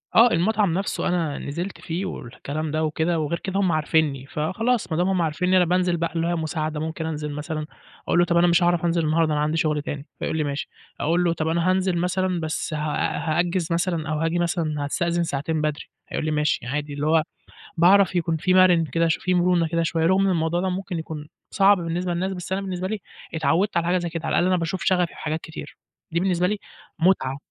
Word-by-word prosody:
آه، 235 Hz, +1 st, +7 dB
المطعم 200 Hz, +1 st, +2 dB
نفسه 195 Hz, +2 st, -1 dB
أنا 165 Hz, -5 st, 0 dB
نزلت 175 Hz, +7 st, -5 dB
فيه، 175 Hz, +3 st, -3 dB
والكلام 150 Hz, 0 st, -5 dB
ده 155 Hz, 0 st, 0 dB
وكده، 160 Hz, +2 st, 0 dB
وغير 155 Hz, +2 st, -2 dB
كده 195 Hz, +1 st, -2 dB
هُم 185 Hz, -3 st, +2 dB
عارفينّي، 155 Hz, -3 st, +1 dB
فخلاص، 190 Hz, -, -1 dB
ما 155 Hz, -, 0 dB
دام 180 Hz, +2 st, +2 dB
هُم 185 Hz, -2 st, +1 dB
عارفينّي، 180 Hz, +4 st, +1 dB
أنا 180 Hz, -, +5 dB
بانزل 180 Hz, 0 st, +1 dB
بقى 170 Hz, +1 st, -2 dB
اللي 165 Hz, +1 st, 0 dB
هي 175 Hz, -, 0 dB
مساعدة، 155 Hz, -1 st, -2 dB
ممكن 160 Hz, +1 st, -4 dB
أنزل 150 Hz, -2 st, -3 dB
مثلًا، 150 Hz, +1 st, -4 dB, 0.4 s
أقُول -, -, +3 dB
له، 175 Hz, -, +5 dB
طَب 170 Hz, -1 st, +1 dB
أنا 175 Hz, -, +5 dB
مش 175 Hz, +1 st, +4 dB
هاعرف 175 Hz, 0 st, +2 dB
أنزل 170 Hz, -1 st, +1 dB
النهاردة، 155 Hz, 0 st, +2 dB
أنا 150 Hz, -, +1 dB
عندي 155 Hz, +2 st, 0 dB
شغل 150 Hz, -2 st, +1 dB
تاني، 145 Hz, -2 st, -5 dB
فيقُول 160 Hz, -, -2 dB
لي 155 Hz, -, +1 dB
ماشي، 140 Hz, 0 st, -3 dB, 0.3 s
أقُول 170 Hz, +4 st, +1 dB
له، 170 Hz, -, +2 dB
طَب 160 Hz, -1 st, -2 dB
أنا 170 Hz, +2 st, +1 dB
هانزل 185 Hz, -1 st, +1 dB
مثلًا، 180 Hz, +1 st, 0 dB
بس 160 Hz, 0 st, -3 dB
ه -, -, -1 dB, 0.4 s
هأجّز 175 Hz, +1 st, 0 dB
مثلًا، 170 Hz, -2 st, 0 dB
أو 155 Hz, -, -1 dB
هآجي 165 Hz, +2 st, 0 dB
مثلًا، 165 Hz, -4 st, -1 dB
هاستأذن 170 Hz, +3 st, 0 dB
ساعتين 155 Hz, +1 st, -2 dB
بدري، 150 Hz, -1 st, -2 dB, 0.3 s
هيقُول -, -, -3 dB
لي 155 Hz, -, 0 dB
ماشي 150 Hz, -5 st, 0 dB
عادي، 145 Hz, +2 st, -3 dB
اللي 145 Hz, +1 st, -2 dB
هو 160 Hz, -1 st, +4 dB, 0.5 s
باعرف 185 Hz, +2 st, +5 dB
يكون 165 Hz, -2 st, +1 dB
في 185 Hz, +4 st, +1 dB
مَرِن 180 Hz, -3 st, +5 dB
كده 165 Hz, +4 st, +1 dB
ش 160 Hz, -, +1 dB
في 185 Hz, -, -1 dB
مرونة 175 Hz, -1 st, +3 dB
كده 170 Hz, +1 st, 0 dB
شوية، 165 Hz, 0 st, 0 dB
رغم 190 Hz, +3 st, +4 dB
إن 195 Hz, -, +3 dB
الموضوع 170 Hz, 0 st, 0 dB
ده 190 Hz, -, 0 dB
ممكن 180 Hz, -2 st, -3 dB
يكون 155 Hz, -2 st, -7 dB, 0.2 s
صعب 200 Hz, 0 st, +5 dB
بالنسبة 175 Hz, +1 st, -2 dB
لناس، 185 Hz, +3 st, -1 dB
بس 180 Hz, 0 st, -7 dB
أنا 190 Hz, -, 0 dB
بالنسبة 185 Hz, -1 st, -3 dB
لي 215 Hz, 0 st, -3 dB, 0.3 s
اتعودت 170 Hz, +4 st, +1 dB
على 170 Hz, -, +1 dB
حاجة 180 Hz, +1 st, +2 dB
زي 175 Hz, -1 st, -2 dB
كده، 165 Hz, -1 st, -5 dB
على -, -, -1 dB
الأقل 175 Hz, -, +3 dB
أنا 185 Hz, -1 st, +3 dB
باشوف 170 Hz, +2 st, -2 dB
شغفي 180 Hz, -2 st, +3 dB
في -, -, -16 dB
حاجات 160 Hz, +1 st, -3 dB
كتير، 160 Hz, -, -9 dB, 0.3 s
دي 170 Hz, -, +1 dB
بالنسبة 180 Hz, -1 st, +1 dB
لي 210 Hz, +2 st, -1 dB, 0.4 s
مُتعة. 160 Hz, -7 st, +2 dB
170 Hz, 225 wpm, -24 LUFS, 155-180 Hz, 0.5 s, آه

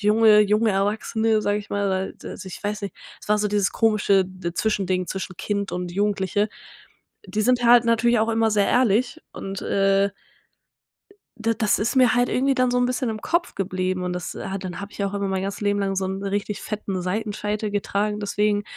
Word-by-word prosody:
junge 210 Hz, 0 st, +5 dB
junge 210 Hz, +2 st, +3 dB
Erwachsene, 215 Hz, +2 st, +1 dB
sage 205 Hz, 0 st, +1 dB
ich 205 Hz, -, -10 dB
mal, 205 Hz, 0 st, 0 dB
weil 190 Hz, 0 st, -4 dB
also, 190 Hz, -, -9 dB
ich 185 Hz, -, -9 dB
weiß 205 Hz, 0 st, -2 dB
nicht. 200 Hz, -, -5 dB, 0.3 s
Es -, -, -12 dB
war 210 Hz, 0 st, +3 dB
so 210 Hz, -, +1 dB
dieses 205 Hz, -1 st, +1 dB
komische 210 Hz, -3 st, +3 dB
d 185 Hz, -2 st, -6 dB
Zwischending 190 Hz, -4 st, 0 dB
zwischen 190 Hz, -1 st, -5 dB
Kind 200 Hz, 0 st, -2 dB
und 180 Hz, -1 st, -4 dB
Jugendliche. 205 Hz, +1 st, 0 dB, 0.8 s
Die 215 Hz, -, -1 dB
sind 245 Hz, +2 st, +2 dB
halt 240 Hz, 0 st, +7 dB
natürlich 235 Hz, 0 st, +3 dB
auch 220 Hz, +1 st, +1 dB
immer 225 Hz, -1 st, +2 dB
sehr 205 Hz, -1 st, +2 dB
ehrlich 250 Hz, +4 st, +2 dB
und, 195 Hz, 0 st, -6 dB
äh 195 Hz, 0 st, +2 dB, 1.3 s
d 225 Hz, 0 st, 0 dB
das 215 Hz, -2 st, +2 dB
ist 230 Hz, +5 st, 0 dB
mir 250 Hz, -2 st, +5 dB
halt 245 Hz, 0 st, +2 dB
irgendwie 270 Hz, +2 st, +1 dB
dann 255 Hz, -1 st, +2 dB
so 250 Hz, -, +1 dB
'n 245 Hz, -, +3 dB
bisschen 255 Hz, 0 st, -1 dB
im 215 Hz, -1 st, -5 dB
Kopf 345 Hz, +7 st, -1 dB
geblieben. 185 Hz, -1 st, -2 dB
Und 180 Hz, -, -2 dB
das, 180 Hz, 0 st, -5 dB
äh, -, -, -6 dB
hat 195 Hz, 0 st, -4 dB
dann 180 Hz, +1 st, -5 dB
habe 200 Hz, 0 st, -8 dB
ich -, -, -13 dB
ja 200 Hz, -, 0 dB
auch 200 Hz, -, -7 dB
immer 200 Hz, 0 st, -1 dB
mein 190 Hz, -1 st, -1 dB
ganzes 195 Hz, +1 st, -4 dB
Leben 205 Hz, -1 st, +1 dB
lang 195 Hz, -1 st, -1 dB
so 190 Hz, -, 0 dB
'n 190 Hz, +1 st, -3 dB
richtig 200 Hz, +1 st, -2 dB
fetten 200 Hz, -3 st, -4 dB
Seitenscheitel 210 Hz, +2 st, -2 dB
getragen 205 Hz, +1 st, -1 dB
deswegen. 205 Hz, 0 st, 0 dB
205 Hz, 210 wpm, -23 LUFS, 195-220 Hz, 1.3 s, halt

